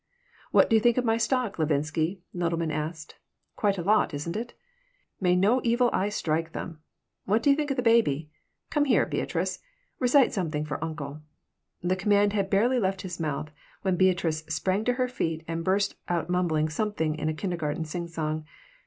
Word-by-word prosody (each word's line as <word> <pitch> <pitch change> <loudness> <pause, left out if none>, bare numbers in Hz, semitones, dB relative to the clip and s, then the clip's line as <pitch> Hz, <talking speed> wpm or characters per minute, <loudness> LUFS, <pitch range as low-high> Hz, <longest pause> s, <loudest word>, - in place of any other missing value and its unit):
"What - - +5
do 225 - +3
you - - +6
think 240 +2 +3
of 250 - +1
my 225 -1 +2
stock, 240 -4 0
Levinsky?" 160 +4 0
Nodelman 170 -2 -1
asked. 155 +1 -5 0.4
"Quite 200 -2 +1
a 175 - -3
lot, 205 -5 +3
isn't 160 +5 -4
it? 235 +3 -5 0.6
May 180 -2 +3
no 210 +8 +3
evil 240 +1 +3
eye 195 +2 +1
strike 165 -5 -1
them. 165 -3 -6 0.5
What 215 +4 +2
do 285 - +5
you - - +5
think 295 0 -2
of 275 - -1
the 250 - 0
baby? 160 - +3 0.4
Come 295 -1 +2
here, 275 - +3
Beatrice! - - -2 0.4
Recite 255 +1 +4
something 155 -6 -1
for 150 +1 -4
uncle!" 150 -2 -5 0.6
The 180 +1 +1
command 205 +1 +3
had 200 -2 0
barely 235 +6 +3
left 190 -3 -1
his 180 -2 -6
mouth 150 -1 -3 0.3
when 190 -2 +2
Beatrice 175 -4 +2
sprang 185 +6 0
to 245 - +3
her 255 0 0
feet 165 -10 -2
and 165 0 -3
burst 195 +3 +1 0.2
out 175 0 -1
mumbling 165 -4 +1
something 160 -2 -1
in 155 0 -2
a - - -1
kindergarten 165 -4 -2
singsong. 155 -2 -3
180 Hz, 180 wpm, -27 LUFS, 155-215 Hz, 0.6 s, you